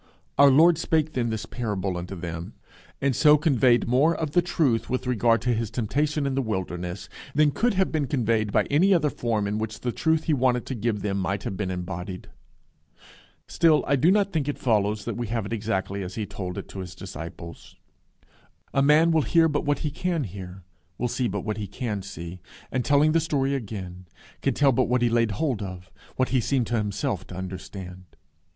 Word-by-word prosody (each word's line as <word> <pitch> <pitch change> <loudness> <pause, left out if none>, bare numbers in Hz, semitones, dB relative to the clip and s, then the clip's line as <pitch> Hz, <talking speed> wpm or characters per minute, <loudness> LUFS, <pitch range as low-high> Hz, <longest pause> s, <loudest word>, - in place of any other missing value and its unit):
Our 140 0 +9
Lord 160 +4 +6
spake 155 -2 +1
then 120 -2 0
this 110 -2 -3
parable 100 -6 -3
unto 90 +2 -5
them, 85 -1 -6 0.5
and 140 -2 +1
so 150 +2 +6
conveyed 130 -5 +3
more 140 +7 +3
of 155 -3 -3
the 175 - +4
truth 135 -10 0
with 130 +1 -2
regard 115 -2 +2
to 125 0 +2
his 115 -2 -2
temptation 145 +6 -1
in 135 - 0
the 135 - +1
wilderness, 90 -4 -4 0.3
than 150 0 +4
could 235 - +1
have 190 0 +1
been 150 -4 0
conveyed 115 -6 0
by - - +3
any 185 +7 +3
other 155 -4 +2
form 110 -4 -1
in 105 +2 -2
which 110 -1 -4
the 125 - -1
truth 160 +4 +1
he 160 - +1
wanted 125 -3 +1
to - - -4
give 110 -3 -2
them 100 -1 -1
might 100 +1 -2
have 95 - -4
been 95 -1 -3
embodied. 90 0 -5 1.2
Still 160 -3 +3
I 140 - +2
do 145 +6 +3
not 200 0 +2
think 150 -4 0
it 145 - -2
follows 105 -3 +1
that - - -3
we 120 -1 -3
have 115 -1 -2
it 105 - -4
exactly 100 -3 -2
as 90 -1 -6
he 110 - -2
told 90 -3 -6
it - - -6
to 95 - -8
his 90 -1 -7
disciples. 85 -2 -9 1.0
A 135 - +3
man 150 +4 +5
will 160 -1 +3
hear 165 +3 +4
but 145 -2 -1
what 145 -1 +1
he 150 - 0
can 170 0 -1
hear, 95 -2 -8 0.3
will 125 - -1
see 125 +1 0
but 100 -1 -3
what 105 +2 -3
he 105 -2 -4
can 105 0 -4
see, 90 -2 -8 0.3
and, 130 -2 0
telling 145 +3 +4
the 165 - +3
story 140 -4 0
again, 95 -7 -6 0.3
can - - 0
tell 140 -2 +4
but 120 - +2
what 125 0 +2
he 120 - +3
laid 115 -2 +2
hold 125 -2 -1
of, 90 -1 -7 0.2
what 130 - +1
he 130 -2 +2
seemed 130 +1 +1
to 120 - -1
himself 105 -2 -2
to - - -9
understand. 95 0 -7
115 Hz, 210 wpm, -25 LUFS, 100-145 Hz, 1.2 s, Our